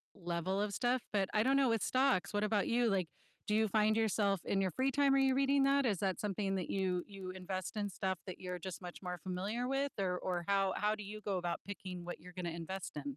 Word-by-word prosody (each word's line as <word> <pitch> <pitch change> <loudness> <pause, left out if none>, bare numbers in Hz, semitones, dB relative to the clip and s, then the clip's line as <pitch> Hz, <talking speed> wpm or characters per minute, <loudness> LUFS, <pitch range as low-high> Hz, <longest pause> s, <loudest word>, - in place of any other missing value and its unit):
level 175 +2 -1
of 210 0 0
stuff, 245 +5 +1
but 200 -2 +1
I 215 - +4
don't 270 +3 +4
know 270 -2 +4
with 225 -3 +1
stocks, 255 -8 +2
what 205 0 +1
about 210 -1 +1
you, 240 0 +3
like, 190 -4 +1 0.4
do 210 - +2
you 220 0 +4
find 215 +1 +3
yourself, 205 -3 +2
in 195 - +1
your 190 -1 +1
free 260 +6 +1
time, 280 0 +4
are - - +5
you 270 -1 +4
reading 275 0 +4
that? 275 0 +4
Is 210 -5 +2
that 190 -2 0
something 195 -1 -1
that 185 -2 -3
you 185 -2 0
you 195 -2 -7
invest 185 +1 -4
in 205 -1 -1
stuff 190 0 -2
that 185 - -7
you're 180 -1 -4
just 185 +2 -6
much 175 -1 -8
more 180 -1 -4
familiar 200 +8 -2
with? 270 +1 0
Or 180 -2 +1
or 175 -2 -2
how 195 -1 +2
how 210 +1 +2
do 210 - -7
you 210 +2 -7
go 200 -3 -2
about 175 -1 -2
picking 185 -3 -6
what 175 - -6
you're 180 - -11
gonna 175 -1 -3
invest 190 +2 -5
in? 150 - -4
200 Hz, 250 wpm, -35 LUFS, 185-220 Hz, 0.4 s, are